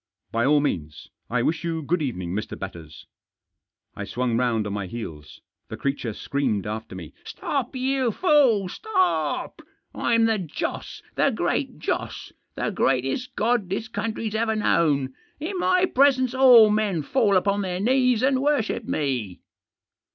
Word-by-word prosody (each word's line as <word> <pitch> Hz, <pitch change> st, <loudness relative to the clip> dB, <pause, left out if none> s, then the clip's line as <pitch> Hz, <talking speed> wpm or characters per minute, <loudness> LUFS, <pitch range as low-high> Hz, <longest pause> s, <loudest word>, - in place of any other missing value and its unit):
"By 115 Hz, +3 st, +1 dB
all 145 Hz, 0 st, +4 dB
means. 75 Hz, -, -4 dB, 0.2 s
I 120 Hz, 0 st, 0 dB
wish 165 Hz, +4 st, 0 dB
you 165 Hz, -2 st, -2 dB
good 165 Hz, +4 st, 0 dB
evening, 90 Hz, -, -3 dB
Mr. 105 Hz, +2 st, -4 dB
Batters." 85 Hz, -5 st, -9 dB, 0.9 s
I 100 Hz, -, -5 dB
swung 120 Hz, +3 st, -2 dB
round 115 Hz, -3 st, +1 dB
on 100 Hz, -, -3 dB
my 100 Hz, -2 st, -3 dB
heels. 80 Hz, -9 st, -8 dB, 0.3 s
The -, -, -6 dB
creature 135 Hz, -5 st, -2 dB
screamed 110 Hz, -5 st, -2 dB
after 110 Hz, -2 st, -5 dB
me. 85 Hz, -6 st, -9 dB
" -, -, -31 dB
Stop, 270 Hz, -2 st, -3 dB
you 260 Hz, -1 st, 0 dB
fool, 260 Hz, -, +3 dB
stop! 375 Hz, -, -1 dB, 0.3 s
Fm 230 Hz, -1 st, +2 dB
the 225 Hz, -2 st, +1 dB
Joss 170 Hz, -6 st, -5 dB
— -, -, -38 dB
the -, -, +4 dB
Great -, -, -1 dB
Joss; -, -, -4 dB, 0.2 s
the -, -, -2 dB
greatest 135 Hz, -, 0 dB
god 225 Hz, -4 st, +1 dB
this 205 Hz, +5 st, -3 dB
country's 220 Hz, 0 st, -3 dB
ever 220 Hz, 0 st, 0 dB
known. 145 Hz, -10 st, +1 dB, 0.3 s
In 360 Hz, +5 st, -4 dB
my 365 Hz, 0 st, +3 dB
presence 260 Hz, -5 st, +3 dB
all 250 Hz, -5 st, +7 dB
men 205 Hz, -7 st, 0 dB
fall 210 Hz, -, +2 dB
upon 200 Hz, +2 st, +1 dB
their 180 Hz, -2 st, -3 dB
knees 250 Hz, +1 st, +2 dB
and 265 Hz, 0 st, +2 dB
worship 285 Hz, -6 st, 0 dB
me." 125 Hz, -, -2 dB
185 Hz, 155 wpm, -24 LUFS, -, 0.9 s, all